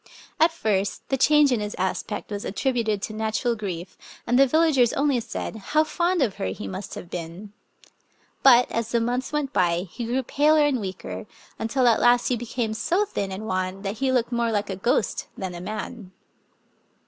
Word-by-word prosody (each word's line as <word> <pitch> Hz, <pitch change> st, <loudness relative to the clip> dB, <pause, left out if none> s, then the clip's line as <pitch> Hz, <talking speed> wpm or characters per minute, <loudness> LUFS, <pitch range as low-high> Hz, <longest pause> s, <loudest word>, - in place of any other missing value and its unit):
At 325 Hz, +1 st, +5 dB
first 205 Hz, -, -1 dB
the 270 Hz, -, +2 dB
change 295 Hz, +1 st, +5 dB
in 245 Hz, -, +2 dB
his 210 Hz, 0 st, -4 dB
aspect 190 Hz, +3 st, -3 dB
was 205 Hz, 0 st, -4 dB
attributed 220 Hz, -3 st, -1 dB
to 215 Hz, -, -4 dB
natural 220 Hz, +2 st, -1 dB
grief, 185 Hz, -4 st, -6 dB, 0.3 s
and 245 Hz, +2 st, +2 dB
the 275 Hz, -, +7 dB
villagers 290 Hz, -5 st, +3 dB
only 280 Hz, -3 st, +2 dB
said, 220 Hz, -, -5 dB
"How 305 Hz, +9 st, +1 dB
fond 345 Hz, +1 st, +1 dB
of 215 Hz, -7 st, -2 dB
her -, -, -2 dB
he 95 Hz, +2 st, -5 dB
must 185 Hz, -, -6 dB
have -, -, -8 dB
been! 175 Hz, +4 st, -7 dB, 0.4 s
'* -, -, -39 dB
But, 250 Hz, -2 st, +6 dB
as 230 Hz, -1 st, -2 dB
the 235 Hz, -, +2 dB
months 245 Hz, +3 st, -1 dB
went 295 Hz, -2 st, -2 dB
by, 175 Hz, -3 st, +2 dB
he 240 Hz, -, -5 dB
grew 250 Hz, +3 st, -1 dB
paler 300 Hz, +4 st, +3 dB
and 280 Hz, -4 st, +1 dB
weaker, 190 Hz, +2 st, -6 dB, 0.3 s
until 245 Hz, +3 st, +1 dB
at 230 Hz, -, +4 dB
last 240 Hz, 0 st, +4 dB
he 250 Hz, -, +2 dB
became 235 Hz, -1 st, -3 dB
so 350 Hz, -, +1 dB
thin 200 Hz, -, -3 dB
and 195 Hz, +3 st, -5 dB
wan 185 Hz, 0 st, -2 dB
that 205 Hz, +2 st, -4 dB
he 270 Hz, -1 st, +1 dB
looked 250 Hz, -1 st, +1 dB
more 235 Hz, -1 st, +1 dB
like 205 Hz, -2 st, -1 dB
a -, -, -3 dB
ghost 205 Hz, +2 st, 0 dB
than 185 Hz, -2 st, -4 dB
a 175 Hz, -, -7 dB
man. 215 Hz, +1 st, -6 dB
230 Hz, 195 wpm, -24 LUFS, 200-265 Hz, 0.4 s, the